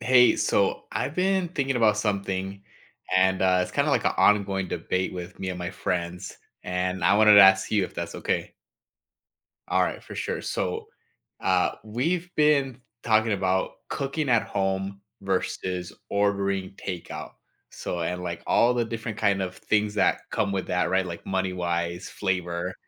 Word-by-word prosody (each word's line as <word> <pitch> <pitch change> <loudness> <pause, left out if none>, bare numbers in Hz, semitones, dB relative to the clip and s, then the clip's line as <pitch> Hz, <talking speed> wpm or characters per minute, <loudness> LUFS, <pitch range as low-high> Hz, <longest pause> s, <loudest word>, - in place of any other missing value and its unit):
Hey, 125 -1 +5
so 100 -1 +1
I've 130 +4 -2
been 190 0 +1
thinking 135 -6 -1
about 110 -3 +4
something, 100 -2 -2 0.5
and, 95 0 +3
uh, 90 -1 +4
it's 90 - -5
kinda 145 +1 +1
like 125 -6 +1
an - - +3
ongoing 95 -1 +3
debate 95 +2 -2
with 90 0 -8
me 95 - -4
and 90 -1 -4
my 90 0 -4
friends, 90 -2 -3 0.3
and 90 +1 -2
I - - +5
wanted 105 -1 +7
to 100 - +10
ask 95 0 +6
you 105 -3 +2
if - - -9
that's - - -5
okay. - - -2 1.1
All - - +3
right, - - -3
for - - -10
sure, - - -3
so, - - -3 0.5
uh, - - +2
we've 165 +12 -1
been 140 -4 +2 0.2
talking 110 -1 +3
about 95 -1 0 0.2
cooking 140 +2 -2
at 115 -3 +4
home 95 0 -2 0.2
versus 95 -2 -2 0.2
ordering 100 -1 0
takeout. 90 -3 -7 0.4
So, 90 - -5
and 90 +2 -2
like 85 -1 -4
all 120 +1 +4
the 120 -1 +1
different 115 -1 -5
kind 100 -2 +2
of 95 -1 -4
things 105 0 0
that - - +2
come 100 - 0
with 95 -2 -2
that, 90 -2 0
right, 95 +1 +2
like 85 -2 -7
money-wise, 90 -2 -2
flavor, 90 -2 -2
95 Hz, 165 wpm, -26 LUFS, 90-110 Hz, 1.1 s, to